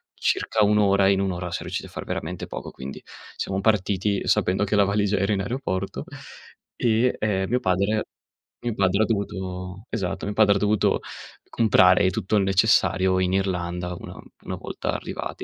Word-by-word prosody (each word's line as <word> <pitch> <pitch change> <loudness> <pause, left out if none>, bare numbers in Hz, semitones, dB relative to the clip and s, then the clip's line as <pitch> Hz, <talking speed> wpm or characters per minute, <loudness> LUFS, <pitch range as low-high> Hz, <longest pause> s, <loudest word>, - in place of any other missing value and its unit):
circa 110 - +1
1 105 +1 +3
ora 100 -1 +4
e - - +5
in 95 - +2
1 95 -1 0
ora 90 0 -5
siam 85 - -4
riusciti - - -4
a - - -17
far - - -7
veramente 90 +3 -4
poco. - - -7
Quindi 65 +1 -8 0.3
siamo 95 0 -2
partiti 100 -1 +1
sapendo 95 +2 +2
che 105 +1 0
la 100 - +5
valigia 100 0 +1
era 100 +2 +1
in 95 - 0
aeroporto 100 -4 -3 0.7
e, 120 +1 +2
ehm, 95 -3 0
mio 125 - +2
padre 100 +2 +1 0.6
mio 120 -3 -2
padre 100 +2 +2
ha - - +2
dovuto 95 -1 -4
esatto, 95 -6 -3
mio 105 - -3
padre 105 -1 +4
ha - - +3
dovuto 105 +1 +2 0.5
comprare 95 -4 +4
tutto 100 +3 0
il 100 - +3
necessario 95 -1 +3
in 90 0 +1
Irlanda 90 -2 -1
una - - -9 0.3
una - - -4
volta - - -4
arrivati. - - -5
100 Hz, 180 wpm, -24 LUFS, 95-105 Hz, 0.7 s, e